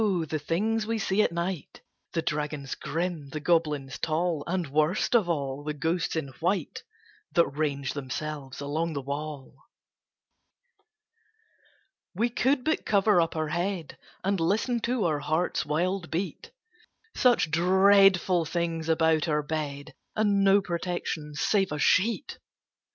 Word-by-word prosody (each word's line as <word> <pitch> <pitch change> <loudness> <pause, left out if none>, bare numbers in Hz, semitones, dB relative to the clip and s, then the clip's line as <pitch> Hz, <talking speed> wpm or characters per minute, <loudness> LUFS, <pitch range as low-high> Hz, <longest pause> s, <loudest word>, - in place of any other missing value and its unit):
the 165 -7 0
things 215 +8 0
we 225 0 0
see 200 -1 +1
at - - +2
night 170 -2 -4 0.3
The 165 -2 -1
dragons 150 -2 -3
grim, 165 -3 -3
the 155 - -5
goblins 150 -5 0
tall, 160 -1 0
And, 180 0 -1
worst 155 - +1
of 210 -7 +3
all, 140 -3 -2
the 150 0 -3
ghosts 165 +4 -1
in 155 -4 -2
white 180 +4 -1 0.5
That 170 - +5
range 140 -2 -2
themselves 145 0 -5
along 155 +4 -2
the 140 - -3
wall! 145 0 -5 2.6
We 230 +6 +1
could 260 +2 +1
but 315 +3 0
cover 200 -2 +4
up 165 - -1
our 155 -1 -1
head, 175 -1 -3 0.2
And 195 0 +1
listen 215 +8 +1
to 240 -4 0
our 155 -3 +1
heart's 155 +4 -1
wild 175 +4 -1
beat 190 - -4 0.7
Such 240 -11 +3
dreadful 190 0 +5
things 165 0 -2
about 160 0 +3
our 150 -1 +1
bed, 145 -1 -4 0.2
And 205 -2 +2
no 195 +1 +5
protection 170 -4 -3
save 195 +4 +1
a 150 - -2
sheet! 215 - +1
165 Hz, 135 wpm, -27 LUFS, 150-195 Hz, 2.6 s, That